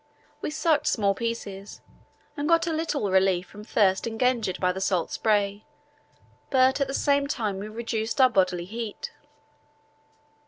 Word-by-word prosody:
We - - -2
sucked 305 -1 +1
small 200 -3 +2
pieces 200 -3 -5 0.5
and 290 -1 -2
got 335 0 +4
a 330 - -1
little 310 - -1
relief 190 -1 +3
from 210 +4 -12
thirst 195 -2 +2
engendered 230 -4 0
by 180 -1 +2
the 190 +1 -5
salt 185 -4 0
spray, 205 -1 0 0.9
but 260 +1 +3
at 275 - +2
the 270 - -4
same 280 -1 +2
time 215 -8 -2
we 205 - -5
reduced 225 +1 -3
our 260 - +8
bodily 185 -4 +1
heat. 220 +2 -6
220 Hz, 150 wpm, -26 LUFS, 195-265 Hz, 0.9 s, our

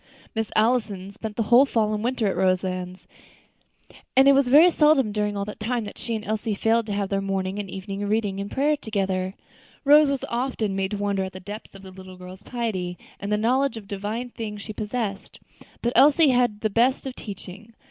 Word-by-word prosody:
Miss 225 -1 -2
Allison 215 -4 +1
spent 215 +1 -7
the 230 - 0
whole 240 +5 +6
fall 215 -4 +1
and 210 0 -2
winter 245 -1 0
at 195 - 0
Roselands; 185 -1 -1 1.1
and 270 +1 +7
it - - +9
was 275 -1 +4
very 310 +8 +7
seldom 300 -8 +3
during 210 -1 -1
all 200 - -2
that 210 - -8
time 235 +2 -1
that 205 - -9
she 230 - -3
and 215 0 -5
Elsie 215 0 -2
failed 225 +2 +1
to - - -4
have 200 -1 -2
their 195 -1 0
morning 195 0 -2
and 200 -2 -5
evening 195 +2 -5
reading 205 -2 0
and 200 0 -4
prayer 290 +5 +1
together. 195 -6 -2 0.5
Rose 295 +1 +7
was 275 -1 -2
often 235 -5 -2
made 190 0 -1
to 205 - -3
wonder 200 -1 -1
at 190 - -8
the 185 - -8
depth 205 +2 -9
of 195 - -12
the 190 - -10
little 185 0 -12
girl's 185 +1 -11
piety 190 -8 -3 0.2
and 200 +1 -5
the 210 - +2
knowledge 250 +3 +1
of 205 -3 -10
divine 210 +5 -4
things 210 -3 -6
she 215 - -7
possessed. 210 -2 -4 0.4
But 240 +1 0
Elsie 290 +4 +6
had 250 -1 +3
had 210 - -20
the 215 -2 0
best 245 +6 +2
of 260 -1 -5
teaching. 205 +2 -9
210 Hz, 215 wpm, -24 LUFS, 195-240 Hz, 1.1 s, it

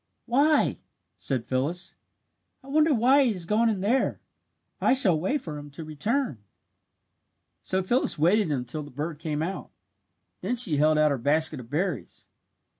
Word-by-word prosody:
"Why!" 285 +5 +2 0.4
said 130 -4 -2
Phyllis. 150 +8 -2 0.7
"I 270 - -14
wonder 310 +2 +3
why 265 +3 +4
he 240 -4 +1
has 180 -4 -6
gone 220 +5 +2
in 205 -4 -2
there. 235 +7 +1 0.6
I - - +4
shall 190 - +3
wait 235 - -1
for 150 -3 -7
him 145 0 -10
to 145 +3 -8
return." 155 - -2 1.2
So 190 0 -1
Phyllis 240 +8 +1
waited 175 +3 +2
until 130 +2 -3
the 145 - -9
bird 145 +3 -5
came 155 -2 -2
out. 190 +4 -5 0.7
Then 245 - -1
she 185 -11 +3
held 155 +1 +3
out 155 -1 +4
her 140 - -1
basket 155 +3 +2
of 120 -2 -11
berries. 150 - -3
170 Hz, 160 wpm, -26 LUFS, 150-235 Hz, 1.2 s, why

